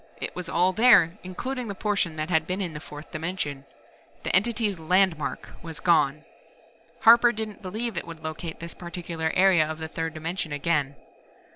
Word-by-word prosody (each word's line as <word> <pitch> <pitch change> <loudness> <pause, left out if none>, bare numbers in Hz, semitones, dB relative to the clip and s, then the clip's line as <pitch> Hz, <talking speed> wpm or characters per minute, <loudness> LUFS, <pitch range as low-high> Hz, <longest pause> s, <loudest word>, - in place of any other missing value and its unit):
It - - -4
was 180 -1 -5
all 180 +2 +2
there, 220 -6 +5
including 250 +7 -5
the 200 - -5
portion 200 -6 0
that 155 +3 -4
had 160 -1 +2
been 185 +2 -2
in 180 -5 -3
the 150 - -6
fourth 150 0 -11
dimension. 155 -4 -4 0.6
The - - 0
Entity's 210 -1 +2
"landmark" 170 -2 +1
was 165 -3 -8
gone. 155 -3 +2 0.8
Harper 235 +1 +7
didn't 215 -2 -3
believe 215 +4 -4
It - - -4
would 165 -1 -10
locate 160 +1 -6
this 170 0 -6
particular 170 -2 -4
area 185 -3 +5
of 155 - -4
the 160 0 -5
third 165 0 -4
dimension 160 +1 -3
again. 145 -1 0
170 Hz, 170 wpm, -26 LUFS, 160-195 Hz, 0.8 s, Harper